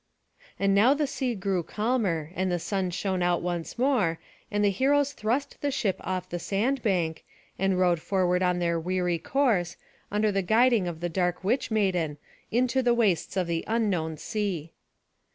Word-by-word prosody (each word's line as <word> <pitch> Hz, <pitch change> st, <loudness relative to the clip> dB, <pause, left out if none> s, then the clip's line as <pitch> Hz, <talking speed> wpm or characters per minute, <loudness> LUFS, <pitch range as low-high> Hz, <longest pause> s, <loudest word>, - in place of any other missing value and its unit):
And 195 Hz, 0 st, +2 dB
now 230 Hz, +8 st, +5 dB
the 295 Hz, 0 st, +1 dB
sea 260 Hz, -3 st, -2 dB
grew 190 Hz, -2 st, -1 dB
calmer, 195 Hz, -5 st, -1 dB
and 185 Hz, 0 st, -1 dB
the 175 Hz, -, +1 dB
sun 185 Hz, +2 st, -2 dB
shone 185 Hz, +1 st, -2 dB
out 175 Hz, -1 st, +1 dB
once 175 Hz, +1 st, -3 dB
more, 235 Hz, -11 st, +2 dB, 0.3 s
and 205 Hz, 0 st, +1 dB
the 200 Hz, -, +4 dB
heroes 285 Hz, +6 st, +2 dB
thrust 250 Hz, +6 st, -2 dB
the 290 Hz, -, 0 dB
ship 215 Hz, -8 st, 0 dB
off 185 Hz, -1 st, -3 dB
the 175 Hz, -, -4 dB
sand 235 Hz, +10 st, 0 dB
bank, 175 Hz, -7 st, 0 dB, 0.4 s
and 195 Hz, 0 st, +2 dB
rowed 175 Hz, -2 st, +3 dB
forward 180 Hz, -1 st, +1 dB
on 180 Hz, -1 st, +2 dB
their 170 Hz, -1 st, 0 dB
weary 180 Hz, 0 st, -1 dB
course, 215 Hz, -, +1 dB, 0.3 s
under 210 Hz, +1 st, +2 dB
the 195 Hz, 0 st, +1 dB
guiding 225 Hz, +1 st, +3 dB
of 165 Hz, -2 st, -5 dB
the 175 Hz, -, -1 dB
dark 180 Hz, +1 st, -1 dB
witch 235 Hz, +8 st, 0 dB
maiden, 180 Hz, -9 st, 0 dB, 0.3 s
into 250 Hz, +2 st, +2 dB
the 240 Hz, -1 st, +3 dB
wastes 195 Hz, -5 st, +1 dB
of 185 Hz, -, +2 dB
the 165 Hz, -1 st, -2 dB
unknown 190 Hz, -9 st, 0 dB
sea. 180 Hz, -5 st, -3 dB
190 Hz, 175 wpm, -27 LUFS, 175-230 Hz, 0.4 s, now